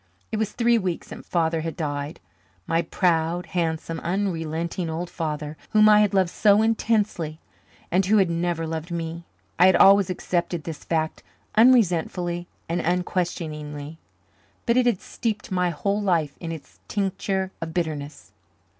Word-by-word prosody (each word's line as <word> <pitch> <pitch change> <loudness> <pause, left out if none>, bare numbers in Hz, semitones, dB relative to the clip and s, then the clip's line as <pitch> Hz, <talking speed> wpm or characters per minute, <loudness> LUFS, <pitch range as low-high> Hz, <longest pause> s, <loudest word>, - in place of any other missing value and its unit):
It - - -1
was 215 -2 -1
three 235 -1 +3
weeks 185 -4 -3
since - - -10
Father 165 -2 +1
had 165 0 -5
died 145 -1 -3 0.5
my 165 +1 +1
proud, 170 0 0
handsome, 165 -1 -2
unrelenting 170 -2 -2
old 170 +2 -4
father, 155 -2 -4 0.2
whom 215 0 +7
I 210 0 +7
had 210 -2 +3
loved 185 -3 +3
so 210 0 +4
intensely 210 -8 0 0.5
and 185 +3 +3
who 215 +2 +4
had 195 -2 +4
never 170 -1 -1
loved 160 +1 -4
me. 170 0 -4 0.3
I 180 - +8
had 185 - +5
always 195 -1 +6
accepted 175 -2 -2
this 160 -1 -7
fact 160 -1 -1 0.3
unresentfully 180 -7 +3 0.2
and 170 +1 -1
unquestioningly, 160 -4 -3 0.7
but 235 - +2
it 250 -1 +4
had 225 -6 +1
steeped 215 -3 -4
my 180 -1 +1
whole 200 +6 -1
life 165 -8 +1
in 165 -2 -5
its 160 -3 -10
tincture 190 -1 -1
of 165 -1 -4
bitterness. 155 -4 -4
175 Hz, 150 wpm, -24 LUFS, 160-195 Hz, 0.7 s, I